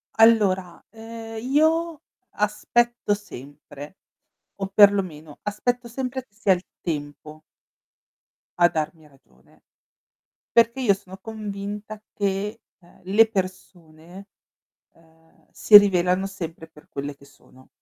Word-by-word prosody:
Allora, 200 -6 +3
ehm, 225 0 -9
io 315 +5 +1 0.3
aspetto 210 +2 0
sempre, 145 -4 -10 0.6
o 195 -1 -4
perlomeno 190 -7 +3
aspetto 240 +4 -2
sempre 260 +1 -4
che 200 - -43
sia 205 -2 +1
il 180 +1 -5 0.2
tempo 150 -1 -6 1.2
a 175 - +7
darmi 155 0 -4
ragione, 130 - -27 0.9
perché 235 +3 +3
io 205 -5 +4
sono 190 -1 -11
convinta 210 0 -7
che, 205 +2 -2 0.2
ehm, 175 -1 -23
le 205 +5 +4
persone, 185 -2 -7 0.7
ehm, 160 0 -27
si 210 - +7
rivelano 185 -1 +1
sempre 165 -4 -7
per 150 - -20
quelle 140 +1 -6
che 140 - -19
sono. 130 -1 -21
195 Hz, 110 wpm, -23 LUFS, 160-225 Hz, 1.2 s, a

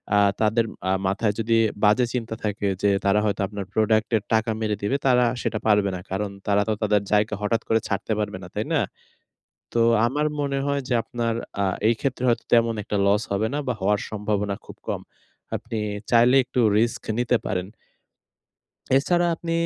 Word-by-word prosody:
আ 105 - +5 0.2
তাদের 110 +2 +3 0.2
আ - - +3 0.2
মাথায় 105 +2 0
যদি 115 +1 +1 0.3
বাজে 105 +4 +5
চিন্তা 115 -2 -3
থাকে, 105 -1 -1
যে 100 - +3 0.2
তারা 100 +1 +4
হয়তো 105 0 -1
আপনার 100 -1 -6
প্রোডাক্টের 110 0 +2
টাকা 110 +1 +2
মেরে 105 -1 0
দিবে, 120 +8 0
তারা 125 -1 +4 0.2
সেটা 110 - -2
পারবে 105 -2 +4
না। - - -5
কারণ, 100 +2 -1 0.2
তারা 100 0 +3
তো 110 - +1
তাদের 105 -1 +3
জায়গা 105 0 +2
হঠাৎ 115 +2 0
করে 115 - +3
ছাড়তে 100 +2 -2
পারবে 105 -3 -2
না। - - -8
তাই - - -1
না? - - +3 0.9
তো - - 0 0.3
আমার 150 +5 0
মনে 140 -1 -1
হয় 140 0 0
যে, 125 - +1
আপনার 115 -1 -2 0.3
আ - - +2 0.2
এইক্ষেত্রে 125 +2 -1
হয়তো 120 - +1
তেমন 115 -1 +4
একটা 105 - -3
লস 105 +2 +3
হবে 110 +3 +1
না 145 - 0
বা, 125 - +1
হওয়ার 100 +1 +2
সম্ভাবনা 105 -1 -1
খুব - - -11
কম। - - -2 0.6
আপনি 115 -1 -5 0.3
চাইলে 120 +3 +5
একটু 125 - -1 0.2
রিস্ক 115 +1 0 0.2
নিতে 125 0 +2
পারেন। 90 0 -2 1.3
এছাড়া 175 +5 +2
আপনি 165 0 -5
110 Hz, 180 wpm, -24 LUFS, 105-120 Hz, 1.3 s, আ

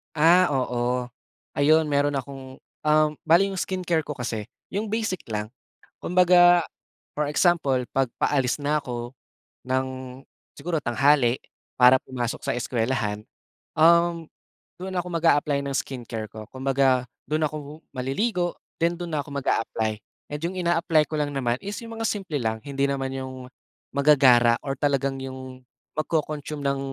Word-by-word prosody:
Ah, 170 +4 +6
oo, 125 -2 -1 0.5
ayun 155 +3 +5
meron 145 0 +2
akong, 135 -1 -6 0.3
um 155 0 +5 0.2
bale 170 +4 +6
yung 190 - -4
skincare 180 -3 0
ko 150 -1 -5
kasi 115 -5 -4 0.2
yung 210 +3 -2
basic 220 -3 -1
lang. 105 -1 -4 0.5
Kumbaga, 175 -1 +5 0.5
for 150 -1 -1
example 150 -6 +2
'pag 135 -2 +1
paalis 135 -2 +1
na 150 +1 0
ko 120 0 -6 0.5
ng 130 0 -3 0.3
siguro 170 -1 -3
tanghali 135 -1 +2 0.3
para 125 +1 +6
pumasok 120 -2 -3
sa - - 0
eskuwelahan, 115 -3 -1 0.5
um, 170 +1 +4 0.5
dun 185 +2 -6
ako 175 - -4
mag-a-apply 150 -4 +2
ng 140 - -4
skincare 120 -5 -4
ko. 110 +1 -9
Kumbaga, 130 -1 +1 0.2
dun 155 +2 0
ako 150 0 -8 0.2
maliligo. 175 - -1 0.2
Then, 170 +1 +1
dun 170 -3 -4
na 145 - -1
'ko 145 - -13
mag-a-apply, 115 -5 -1 0.3
and 150 - -5
yung 185 +2 -2
ina-apply 170 -3 +2
ko 155 - -4
lang 150 -1 -1
naman 125 -4 0
is 200 +3 -5
yung 230 -1 -8
mga 225 - -4
simple 195 -7 -3
lang. 110 -5 -1
Hindi 140 +3 -3
naman 135 -1 -1
yung 130 -1 -6 0.5
magagara 130 -5 +5
or 135 -1 -4
talagang 135 -1 0
yung 130 -1 -8 0.3
mag-co-consume 155 -2 -2
ng 140 0 0
140 Hz, 145 wpm, -25 LUFS, 130-165 Hz, 0.5 s, Ah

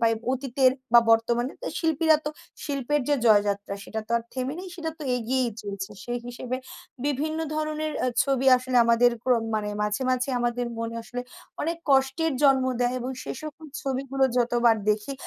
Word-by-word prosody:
পাই 230 -1 +4 0.2
অতীতের 260 0 +2 0.2
বা 235 - +9
বর্তমানে 235 +3 +2 0.3
শিল্পীরা 320 -1 +3
তো 300 - -1 0.3
শিল্পের 285 0 0
যে, 290 - +4
জয়যাত্রা 205 -2 +3
সেটা 220 - -4
তো - - -28
আর 235 - -1
থেমে 260 +2 -2
নেই, 370 +1 -7
সেটা 325 -2 -3
তো - - -8
এগিয়ে 250 +2 0 0.2
চলছে। 200 -1 -5
সেই 240 0 -2
হিসেবে 245 +1 -4 0.5
বিভিন্ন 300 +3 -1 0.2
ধরনের 310 0 -2
আ - - +2 0.2
ছবি 270 -1 0
আসলে 255 0 -2
আমাদের 235 +1 +5
প্রম 245 -3 +3
মানে 210 -1 -1
মাঝে, 210 +4 -1
মাঝে, 255 +1 0
আমাদের 240 0 0
মনে 230 0 -3
আসলে 245 +2 -6 0.4
অনেক 335 +2 -1
কষ্টের 270 +4 +3
জন্ম 270 -2 +5 0.2
দেয় 245 0 +1
এবং 250 +2 -3
সেই - - -5
সকল 310 +1 -8 0.2
ছবিগুলো 270 0 0
যতবার 240 -1 +3
দেখি, 210 +5 -1
255 Hz, 170 wpm, -26 LUFS, 235-280 Hz, 0.5 s, বা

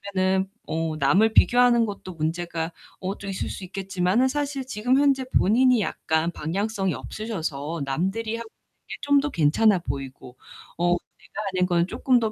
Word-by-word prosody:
보면은 190 0 +2 0.2
어 160 -1 -2
남을 195 +11 +3
비교하는 245 -1 +5
것도 200 -3 -7
문제가 165 +1 -3 0.3
어 190 +2 -3
좀 200 - -7
있을 190 - -3
수 - - -7
있겠지만은 190 +5 0
사실 280 -1 -2
지금 250 +1 +1
현재 275 -2 +3
본인이 245 +3 +4
약간 160 -3 -1
방향성이 195 +4 -2
없으셔서 165 -8 -4
'남들이 195 +11 -1
하는 230 - -6
게 - - -13
좀 285 0 +4
더 295 - -1
괜찮아 185 - +3
보이고 135 -4 -7 0.4
어 175 +1 +2 0.3
내가 210 - -8
하는 180 0 +2
건 175 -1 +1
쪼끔 250 +5 +2
더 220 -1 0
190 Hz, 325 characters per minute, -25 LUFS, 165-230 Hz, 0.4 s, 비교하는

